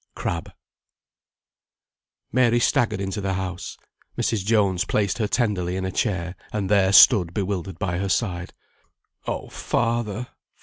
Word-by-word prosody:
CRABBE. 85 -1 -4 1.8
Mary 120 -2 +3
staggered 115 -2 +1
into 100 +1 -3
the 95 -1 -1
house. 90 -1 -5 0.4
Mrs. 110 -4 0
Jones 100 -4 +2
placed 100 +1 0
her 110 - +1
tenderly 100 -7 0
in 95 0 -2
a 95 - -2
chair, 90 -4 -2 0.2
and 105 -2 -2
there 95 -2 +4
stood 95 -5 +7
bewildered 95 -3 -3
by 90 -3 -2
her 100 0 -2
side. 90 -3 -1 0.8
"Oh, - - -4
father! 120 0 -2
100 Hz, 130 wpm, -23 LUFS, 90-110 Hz, 1.8 s, stood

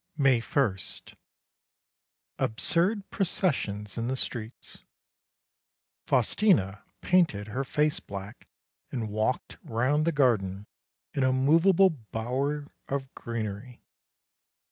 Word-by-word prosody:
May 135 -4 +4
1. 115 -6 +1 1.6
Absurd 180 - +1
processions 115 - -1
in 115 - -1
the 130 - 0
streets. 120 -3 -5 1.3
Faustina 120 - +2 0.2
painted 160 - +2
her 130 +6 -2
face 150 +2 +1
black 100 +1 -9 0.4
and 115 -5 -3
walked 110 +4 -1
round 130 +7 +1
the 170 - +3
garden 105 - +1 0.5
in 140 - -1
a 130 - +4
movable 165 +8 +5
bower 135 +3 -3 0.2
of 135 -1 -3
greenery. 115 +1 -5
130 Hz, 95 wpm, -28 LUFS, 110-150 Hz, 1.6 s, movable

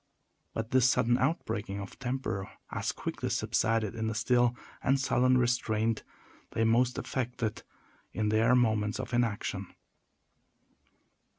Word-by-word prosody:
But 115 +1 -3
this 130 -1 +5
sudden 120 0 +3
outbreaking 110 -8 -1
of 100 -1 -8
temper 125 -7 -3 0.2
as - - -1
quickly - - -4
subsided 110 -2 +1
in 110 -1 -2
the 110 - -2
still 120 +1 +3 0.3
and 135 +1 +2
sullen 130 -1 +3
restraint 115 -3 +1 0.5
they 115 - +1
most 120 +3 +3
affected 120 -4 -3 0.5
in 110 -1 0
their 115 +3 +4
moments 110 -3 +2
of 130 -1 -5
inaction. 105 -5 -1
115 Hz, 120 wpm, -30 LUFS, 110-125 Hz, 0.5 s, this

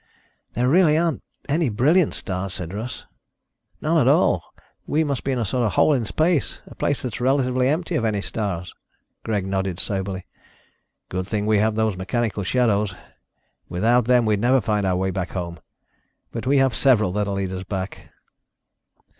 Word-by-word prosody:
"There 120 +3 +1
really 155 +1 +5
aren't 165 -1 0 0.3
any 150 0 +1
brilliant 145 - +3
stars," 95 0 -4
said 90 0 -6
Russ. 110 +5 -6 0.8
"None - - +2
at - - +3
all. - - +3 0.4
We 155 +2 +2
must 140 -4 -2
be 135 - -1
in 130 - 0
a 115 - 0
sort 125 +5 0
of 105 -6 0
hole 150 - +4
in 125 -5 0
space, 160 - 0
a - - -13
place 145 - -1
that's 125 -1 -4
relatively 130 -1 +2
empty 165 +5 -1
of 150 - 0
any 110 -2 0
stars." 100 -4 -4 0.5
Greg 105 -4 -1
nodded 95 -2 -2
soberly. 95 -2 -2 0.8
"Good 95 0 -3
thing 105 0 -1
we 105 -1 +3
have 110 +1 +1
those 110 -2 +1
mechanical 105 +3 -2
shadows. 105 -3 +1 0.7
Without 115 +6 +2
them 125 -1 +4
we'd 105 -2 +1
never 130 +3 +4
find 105 -2 0
our 90 - +1
way 95 +1 0
back 90 -1 -4
home. 85 -3 -4 0.7
But 115 +2 -5
we 140 +1 +4
have 135 -2 +3
several 115 -8 +3
that 105 +2 -1
will 100 - -2
lead 95 -1 -2
us 95 0 -5
back." 95 0 -5
110 Hz, 180 wpm, -23 LUFS, 95-130 Hz, 0.8 s, really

